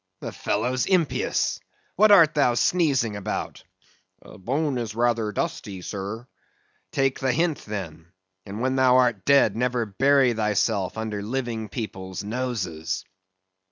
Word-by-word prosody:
The - - -6
fellow's 125 +5 -1
impious! 180 -6 +1 0.4
What 215 +3 +5
art 165 -6 +7
thou 135 -5 +2
sneezing 135 - +1
about? 100 - -5 0.6
Bone 135 +6 -2
is 115 -2 -5
rather 115 -2 +1
dusty, 95 -2 -4
sir. 100 +5 -5 0.7
Take 135 -1 0
the 130 -1 +1
hint, 165 +1 0
then; 85 -5 -7 0.3
and 105 +2 -7
when 130 +1 0
thou 130 -1 +5
art 120 -6 +2
dead, 140 -7 +4
never 125 0 0
bury 135 +5 +3
thyself 105 -2 0
under 110 -2 -3
living 115 -1 -3
people's 95 -6 -6
noses. 95 -8 -3
115 Hz, 125 wpm, -24 LUFS, 105-130 Hz, 0.7 s, art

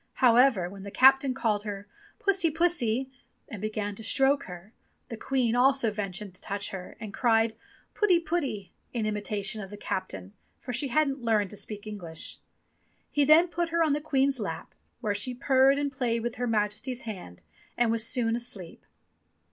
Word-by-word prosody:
However, 240 -6 +4
when 195 +2 -10
the 200 - -7
captain 265 +3 +5
called 215 -5 0
her, 205 -1 -6 0.3
"Pussy, 390 -4 +2
pussy," 275 -7 +1 0.4
and 210 - -8
began 215 -1 -3
to 225 - -10
stroke 270 +4 +2
her, 180 +4 -11 0.4
the 230 - -5
Queen 245 0 0
also 260 -2 +3
ventured 200 -1 -5
to 185 - -11
touch 200 +1 -4
her 185 -2 -8
and 210 -2 -7
cried, 225 -2 +2 0.4
"Putty, 375 -5 +3
putty," 285 - -3 0.2
in 230 -3 -1
imitation 210 0 -3
of 195 - -8
the 205 - -9
captain, 100 - -5 0.3
for 250 - -6
she 280 +4 +1
hadn't 275 0 +1
learned 215 -4 +1
to - - -9
speak 210 0 -5
English. 175 -7 -3 0.7
He 290 -1 +2
then 315 +4 +6
put 345 0 -2
her 335 0 +2
on 310 -3 +2
to 295 - 0
the - - -17
Queen's 275 -3 +1
lap, 165 -7 -5 0.3
where 215 -4 0
she 245 +5 -1
purred 270 +1 +4
and 285 -1 -1
played 240 -4 -1
with 240 0 -3
Her 245 - -1
Majesty's 225 +4 -1
hand 180 - -8 0.3
and 240 -2 +3
was 230 -1 +1
soon 230 -1 +1
asleep. 210 -8 -7
230 Hz, 180 wpm, -28 LUFS, 205-270 Hz, 0.7 s, then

